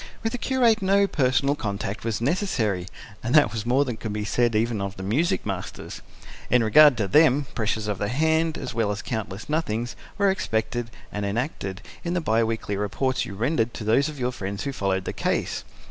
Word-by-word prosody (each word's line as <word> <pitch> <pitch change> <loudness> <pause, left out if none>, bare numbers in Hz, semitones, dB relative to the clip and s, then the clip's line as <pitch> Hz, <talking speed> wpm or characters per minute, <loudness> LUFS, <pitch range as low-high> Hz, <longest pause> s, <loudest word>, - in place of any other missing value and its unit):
With 225 - 0
the 245 - -4
curate, 240 -5 +3
no 200 +1 +4
personal 140 -4 +2
contact 100 -5 -4
was 115 -1 -2
necessary 120 - 0 0.3
and 120 +5 0
that 150 -8 +6
was 110 0 -4
more 135 +4 +3
than 125 -4 -4
could 110 - -5
be 105 0 -3
said 120 +1 +1
even 110 -1 +1
of 100 0 -4
the 95 - -6
music 155 - 0
masters. 95 -2 -5 0.5
In 125 -1 +4
regard 140 +4 +7
to 105 -3 0
them, 145 +1 +4
pressures 110 -1 -1
of 105 -3 -2
the 100 - 0
hand, 160 +5 +1
as - - -5
well 115 -2 0
as 105 - -4
countless 110 -2 -4
nothings, 120 -7 -1 0.2
were 200 -1 +4
expected 120 - -2 0.2
and 105 - -3
enacted, 100 -2 -3 0.2
in 175 +1 -2
the - - +2
bi 115 -7 +2
weekly 110 -2 -2
reports 105 +7 -1
you 100 - -7
rendered 120 +1 0
to - - -5
those 125 +8 +3
of 150 - -8
your 125 0 0
friends 100 -3 -5
who 140 - -3
followed 95 -4 -1
the - - -3
case. - - -1
115 Hz, 205 wpm, -25 LUFS, 105-150 Hz, 0.5 s, regard